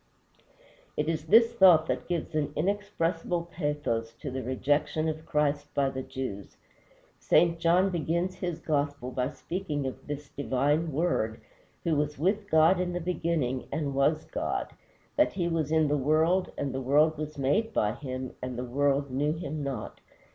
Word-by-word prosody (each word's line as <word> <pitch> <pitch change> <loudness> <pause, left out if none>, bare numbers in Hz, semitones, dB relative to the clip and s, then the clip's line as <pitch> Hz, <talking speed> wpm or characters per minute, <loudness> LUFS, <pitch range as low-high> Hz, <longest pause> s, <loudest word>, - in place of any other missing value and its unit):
It 150 - 0
is 160 -1 -1
this 230 +5 +6
thought 180 -8 +7
that - - -2
gives 175 -2 -2
an 150 -1 -1
inexpressible 175 -2 -1
pathos 145 -9 -2
to 130 +4 -7
the 130 +1 -3
rejection 145 +5 0
of 155 0 -4
Christ 145 -1 0
by 135 -1 +2
the 130 - -4
Jews. 125 -7 -6 0.6
St. 165 -1 +3
John 175 +4 +3
begins 170 +2 -1
his 180 -3 -4
gospel 145 -4 -1
by 125 0 -1
speaking 155 -4 -4
of 130 - -6
this 145 -1 -5
divine 145 +5 0
Word, 135 -8 0 0.4
who 165 -3 +1
was 150 0 -1
with 200 +7 0
God 160 +2 +5
in 180 -1 -1
the 175 - -1
beginning, 165 -7 -1
and 145 -3 -2
was 145 +3 +2
God; - - -3 0.4
that 300 - +4
he 175 -3 -1
was 160 -3 -1
in 160 -1 +3
the 145 +1 +1
world, 160 +6 +2
and 140 - -2
the 135 - -2
world 150 +5 +4
was 150 -1 -5
made 200 +12 +1
by 105 - +1
him, 130 -1 -6
and 130 -1 -4
the 125 - -3
world 140 +2 +1
knew 145 +4 +1
him 155 -2 -5
not. 135 -6 -5
150 Hz, 170 wpm, -28 LUFS, 135-170 Hz, 0.6 s, thought